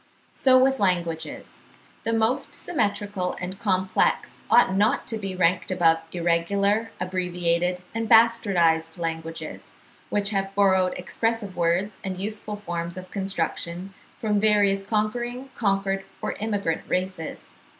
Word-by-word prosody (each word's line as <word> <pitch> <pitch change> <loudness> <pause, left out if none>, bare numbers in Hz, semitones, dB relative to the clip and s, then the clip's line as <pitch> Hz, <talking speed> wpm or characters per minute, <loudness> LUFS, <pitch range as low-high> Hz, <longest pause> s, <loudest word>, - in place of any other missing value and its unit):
So 260 -1 +4
with 265 +1 +3
languages: 175 -4 -2 0.5
the 225 - +1
most 225 +2 +1
symmetrical 205 - -1
and 185 +1 -6
complex 190 -2 +1
ought 240 -5 +5
not 205 +2 +2
to 225 -2 -2
be 195 -2 -4
ranked 180 0 +2
above 165 -3 +3
irregular, 200 +6 +1
abbreviated, 180 -1 -1
and 225 0 -2
bastardised 185 -9 +4
languages, 165 -1 -5 0.4
which 205 0 +1
have 195 -1 -2
borrowed 190 -2 +3
expressive 220 +2 -2
words 175 +4 0
and 190 -1 -4
useful 210 +2 -4
forms 175 -3 -5
of 185 0 -9
construction 190 -1 -3 0.3
from 210 -2 +1
various 205 -2 +3
conquering, 240 +5 -2
conquered, 195 -2 0 0.2
or - - -2
immigrant 205 -6 -2
races. 185 -3 -3
195 Hz, 120 wpm, -25 LUFS, 180-215 Hz, 0.5 s, ought